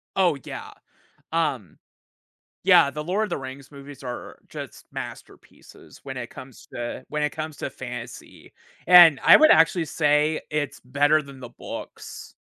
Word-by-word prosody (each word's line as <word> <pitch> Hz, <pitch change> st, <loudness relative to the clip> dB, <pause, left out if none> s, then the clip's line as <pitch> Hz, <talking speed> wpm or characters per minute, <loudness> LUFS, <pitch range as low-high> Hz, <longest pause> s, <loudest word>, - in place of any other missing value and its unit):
Oh, 175 Hz, -6 st, +2 dB
yeah. -, -, -8 dB, 0.6 s
Um 145 Hz, -, -2 dB, 0.9 s
yeah, 140 Hz, -, +6 dB
the 150 Hz, +1 st, -6 dB
Lord 190 Hz, +6 st, 0 dB
of 210 Hz, -, -6 dB
the 170 Hz, -, -2 dB
Rings 135 Hz, 0 st, -9 dB
movies 140 Hz, 0 st, -12 dB
are 125 Hz, -2 st, -7 dB
just -, -, -9 dB
masterpieces -, -, -11 dB
when 135 Hz, -1 st, -8 dB
it 120 Hz, -1 st, -6 dB
comes 130 Hz, -2 st, -13 dB
to 120 Hz, +1 st, -6 dB
when 150 Hz, 0 st, -3 dB
it 150 Hz, -, 0 dB
comes 155 Hz, -1 st, -6 dB
to -, -, -4 dB
fantasy, -, -, -10 dB, 0.3 s
and 175 Hz, -5 st, +8 dB
I -, -, +9 dB
would 310 Hz, 0 st, +6 dB
actually 165 Hz, +1 st, +4 dB
say 150 Hz, 0 st, +1 dB
it's 150 Hz, -2 st, -3 dB
better 145 Hz, +4 st, +2 dB
than 140 Hz, -2 st, -13 dB
the 125 Hz, -, -8 dB
books. -, -, -10 dB
145 Hz, 155 wpm, -24 LUFS, 135-160 Hz, 0.9 s, I